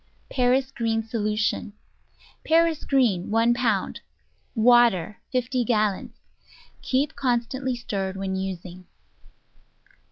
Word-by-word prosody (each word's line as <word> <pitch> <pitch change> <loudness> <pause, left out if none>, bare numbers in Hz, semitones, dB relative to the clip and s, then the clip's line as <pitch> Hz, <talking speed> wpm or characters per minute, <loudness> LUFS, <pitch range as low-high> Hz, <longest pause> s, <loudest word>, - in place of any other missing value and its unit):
Paris 260 +1 +2
green 225 -1 -1
Solution 215 -2 -1 0.7
Paris 325 -1 +2
green 235 -10 +2
1 230 +2 +3
pound 230 -5 -1 0.5
Water 225 -5 +4
50 255 -1 0
gallons 215 -4 0 0.7
Keep 270 +3 0
constantly 255 +1 -1
stirred 195 -5 -4
when 190 -1 -3
using. 185 -1 -6
230 Hz, 90 wpm, -25 LUFS, 200-255 Hz, 0.7 s, Water